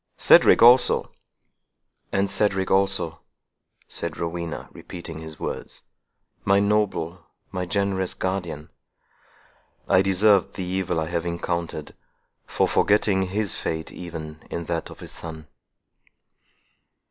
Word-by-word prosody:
Cedric - - +6
also—" 125 +1 +6 1.0
"And 100 +1 +1
Cedric 95 -2 0
also," 95 -4 +1 0.7
said 85 -2 -5
Rowena, 85 -1 -4
repeating 85 -3 -9
his 80 -1 -9
words; - - -5 0.6
"my 100 0 +4
noble—my 95 -3 -2
generous 95 -1 -1
guardian! 85 -5 -3 1.2
I 95 - +5
deserved 95 0 +3
the 95 - -4
evil 90 -2 -1
I 80 - -1
have 85 0 -2
encountered, 85 -2 -3 0.5
for - - +1
forgetting 100 -2 +2
his 100 +1 -1
fate 80 0 -4
even 80 -3 -8
in 85 - -4
that 85 0 -3
of - - -12
his - - -9
son!" 80 -2 -8
90 Hz, 110 wpm, -24 LUFS, 85-95 Hz, 1.2 s, Cedric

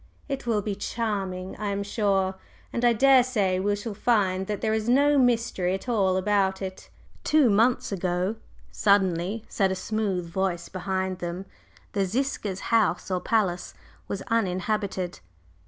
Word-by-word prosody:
"It 275 -3 -4
will 215 -3 +1
be 210 - -2
charming, 195 -3 -3
I 210 - -3
am 200 0 -1
sure, 195 -2 +1 0.4
and 235 - -2
I 240 - +6
daresay 240 -6 +4
we 205 +2 +1
shall 205 +2 -5
find 195 -4 +1
that 210 -2 -2
there 220 -1 +1
is 220 +1 -1
no 285 +3 +4
mystery 230 -7 +1
at 195 - -8
all 195 -6 +2
about 190 -1 +1
it." 190 -1 -7 0.3
"Two 300 -7 +4
months 230 +4 +2
ago," 185 +2 -1 0.3
suddenly 200 +1 +1
said 195 -2 +1
a - - -1
smooth 190 -2 -2
voice 175 -1 -2
behind 190 -1 -2
them, 175 +2 -4 0.5
"the 200 -2 +1
Ziska's 215 -4 -2
house 225 -3 +2
or 185 - +1
palace 185 -5 0 0.3
was 200 - -4
uninhabited." 195 - -1
200 Hz, 150 wpm, -26 LUFS, 185-225 Hz, 0.5 s, I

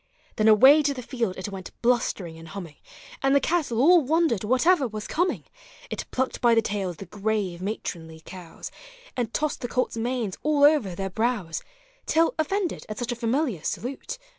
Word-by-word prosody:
Then 215 - +3
away 265 +8 +8
to 285 -1 0
the 250 - -6
field 230 -7 -2
it 190 +2 -5
went 190 -2 -9
blustering 225 -8 0
and 165 - -11
humming, 170 -6 -8 0.4
And 270 +1 +3
the - - +6
cattle 305 -8 0
all 340 +6 +6
wondered 305 - +1
whatever 260 - +3
was 215 -1 -6
coming; 355 +3 -1 0.5
It - - -4
plucked 260 0 -2
by 235 -1 +5
the 225 - +4
tails 195 -5 -3
the 195 - -8
grave 200 -2 -2
matronly 165 -5 -5
cows, 175 -3 -9 0.4
And 240 -3 -2
tossed 300 +2 -2
the 245 - -2
colts' 250 -1 -1
manes 230 -4 -2
all 295 -1 +2
over 285 - +4
their 195 +1 -4
brows, 220 -6 -1 0.5
Till, 325 +1 +3
offended 365 +3 -1
at 215 - -5
such 245 0 -3
a - - -2
familiar 235 - -1
salute. 260 - -4
235 Hz, 180 wpm, -25 LUFS, 195-280 Hz, 0.5 s, away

